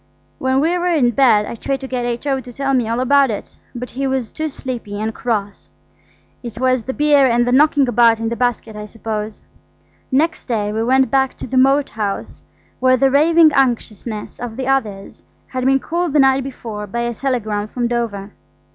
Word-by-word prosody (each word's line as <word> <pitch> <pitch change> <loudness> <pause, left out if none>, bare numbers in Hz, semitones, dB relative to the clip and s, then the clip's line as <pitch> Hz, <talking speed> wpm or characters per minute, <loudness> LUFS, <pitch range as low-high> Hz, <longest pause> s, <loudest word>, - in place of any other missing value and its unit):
When 260 +1 +1
we 330 +4 +1
were 355 - -1
in 295 -9 +2
bed 235 -5 +4
I - - -6
tried 270 +4 -3
to 265 - -6
get 250 -2 -3
H.O. 265 +3 -2
to 250 -1 -10
tell 275 +2 -2
me 245 -4 +1
all 230 +2 -1
about 275 +1 +3
it, 210 - -6 0.2
but 245 +1 -6
he 270 +2 -2
was 260 -4 -2
too 315 0 -3
sleepy 240 -7 -6
and 220 +1 -2
cross. 205 -5 -3 0.7
It 235 -2 -8
was 255 -1 +2
the 260 +4 -5
beer 290 -2 +4
and 240 0 +2
the 245 - 0
knocking 285 0 +4
about 230 -1 +4
in 225 0 -2
the 235 - -3
basket, 235 -3 -2
I 210 0 -6
suppose. 215 -1 -6 0.7
Next 315 +5 0
day 210 -4 -1
we 220 - -1
went 260 +3 +2
back 265 -1 +1
to - - -6
the 260 - -5
Moat 270 +2 +3
House, 210 -2 -5 0.4
where 255 0 +4
the 270 +1 +3
raving 315 +3 +5
anxiousness 235 -4 -2
of 235 -1 -6
the 265 - -3
others 220 -8 -2 0.2
had 255 -1 -4
been 270 0 +4
cooled 340 +1 -2
the 300 - +3
night 270 0 +4
before 220 -6 -7
by 235 +4 -3
a 235 0 -2
telegram 215 -5 -2
from 240 +2 -2
Dover. 220 -4 -3
250 Hz, 200 wpm, -18 LUFS, 225-270 Hz, 0.7 s, raving